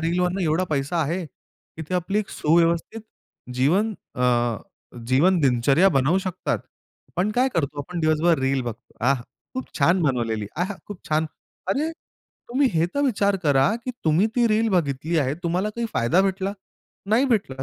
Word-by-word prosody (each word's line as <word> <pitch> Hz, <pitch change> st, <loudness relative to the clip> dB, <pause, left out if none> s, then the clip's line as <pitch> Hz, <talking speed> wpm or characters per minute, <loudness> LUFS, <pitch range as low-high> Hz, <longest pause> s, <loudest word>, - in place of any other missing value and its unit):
रीलवरनं 180 Hz, +3 st, 0 dB
एवढा 165 Hz, +2 st, +1 dB
पैसा 145 Hz, +3 st, -1 dB
आहे 170 Hz, +4 st, -2 dB
की 160 Hz, +3 st, -15 dB
ते 185 Hz, -, -2 dB
आपली 180 Hz, +4 st, 0 dB
एक 215 Hz, -, -2 dB
सुव्यवस्थित 170 Hz, +6 st, +1 dB, 0.5 s
जीवन 180 Hz, -, +2 dB, 0.2 s
अ, 120 Hz, -2 st, +1 dB, 0.5 s
जीवन 160 Hz, +9 st, +4 dB
दिनचर्या 135 Hz, +7 st, +4 dB
बनवू 150 Hz, +2 st, +2 dB
शकतात. 185 Hz, -1 st, -2 dB, 0.5 s
आपण 185 Hz, +4 st, -1 dB
काय 255 Hz, +2 st, +3 dB
करतो? 145 Hz, -3 st, -1 dB
आपण 170 Hz, +4 st, -5 dB
दिवसभर 155 Hz, +1 st, +3 dB
रील 135 Hz, 0 st, +1 dB
बघतो. 120 Hz, -2 st, -8 dB
आह! 135 Hz, -1 st, +3 dB, 0.3 s
खूप 260 Hz, -, -3 dB
छान 170 Hz, +6 st, +4 dB
बनवलेली 115 Hz, -7 st, 0 dB
आहा! 185 Hz, +5 st, -1 dB
खूप 205 Hz, -3 st, -10 dB
छान. 155 Hz, +1 st, +1 dB, 0.4 s
अरे! 295 Hz, +11 st, 0 dB, 0.6 s
तुम्ही 260 Hz, +3 st, +2 dB
हे 165 Hz, 0 st, +2 dB
तर 285 Hz, -, +1 dB
विचार 200 Hz, -5 st, +2 dB
करा 140 Hz, -3 st, +3 dB
की 255 Hz, -, -2 dB
तुम्ही 160 Hz, +7 st, +3 dB
ती 240 Hz, -, +4 dB
रील 220 Hz, +1 st, +2 dB
बघितली 160 Hz, -2 st, 0 dB
आहे. 135 Hz, -1 st, +1 dB
तुम्हाला 180 Hz, +4 st, 0 dB
काही 235 Hz, +2 st, -3 dB
फायदा 120 Hz, +10 st, +2 dB
भेटला? 195 Hz, 0 st, -1 dB, 0.6 s
नाही 225 Hz, +6 st, +4 dB
भेटला. 200 Hz, -, 0 dB
170 Hz, 160 wpm, -23 LUFS, 140-195 Hz, 0.6 s, जीवन